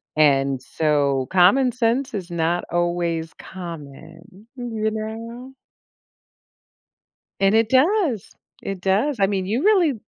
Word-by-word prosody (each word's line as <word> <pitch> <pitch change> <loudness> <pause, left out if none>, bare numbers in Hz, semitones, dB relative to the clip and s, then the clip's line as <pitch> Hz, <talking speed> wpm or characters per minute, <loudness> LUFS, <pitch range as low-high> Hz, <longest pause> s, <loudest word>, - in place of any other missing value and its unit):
and, 135 -3 +3
so 140 -3 0
common 195 +9 +4
sense 245 +2 0
is 190 -4 -5
not 170 +1 0
always 170 -1 -1
common, 165 +3 -11
you 225 -3 -3
know. 230 +4 -7 1.9
And 195 +1 +3
it 225 0 +3
does, 285 - +2 0.3
it 195 -2 -5
does 215 +10 +1
I 195 - +4
mean, 195 -2 -2
you 225 - -1
really 375 -8 +4
195 Hz, 115 wpm, -22 LUFS, 165-240 Hz, 1.9 s, common